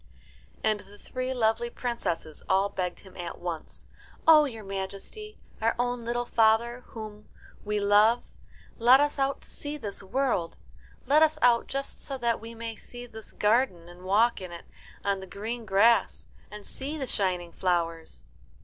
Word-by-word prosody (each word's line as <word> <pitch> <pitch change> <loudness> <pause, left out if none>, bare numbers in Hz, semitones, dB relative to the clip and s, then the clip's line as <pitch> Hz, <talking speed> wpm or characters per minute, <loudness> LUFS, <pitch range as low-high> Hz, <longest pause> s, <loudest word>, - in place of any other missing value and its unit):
And 215 -1 +2
the 205 +1 -14
three 255 +4 -4
lovely 235 -1 +1
princesses 205 -11 -3
all 195 +1 +3
begged 180 -2 -3
him 190 - -16
at 175 -2 -6
once, 170 -3 -6 0.4
"Oh, 310 -2 +9
your 225 -6 -6
Majesty, 195 - -6 0.2
our 225 +1 +2
own 245 0 0
little 240 +1 -2
father, 230 +1 +3
whom, 215 -2 -9 0.3
we 210 0 -1
love, 210 +4 +5 0.6
let 245 +3 +7
us 290 0 +1
out 275 0 0
to - - -12
see 295 +1 -5
this 205 -8 -5
world. 195 -4 -1 0.5
Let 290 +4 +5
us 315 -1 +4
out 240 -1 +5
just 275 0 -4
so 275 - -3
that 235 -3 0
we 230 +1 -8
may 230 0 -5
see 245 +2 -10
this 220 -2 -11
garden, 210 -6 +1
and 175 +1 -13
walk 205 +5 +3
in 185 -2 -7
it 170 - -9 0.4
on 200 -1 +1
the 190 - -9
green 225 +4 -5
grass, 225 +5 +4 0.2
and 210 -1 -10
see 285 +4 -5
the 275 - -2
shining 180 -7 -1
flowers." 165 - -1
220 Hz, 165 wpm, -28 LUFS, 195-245 Hz, 0.6 s, Oh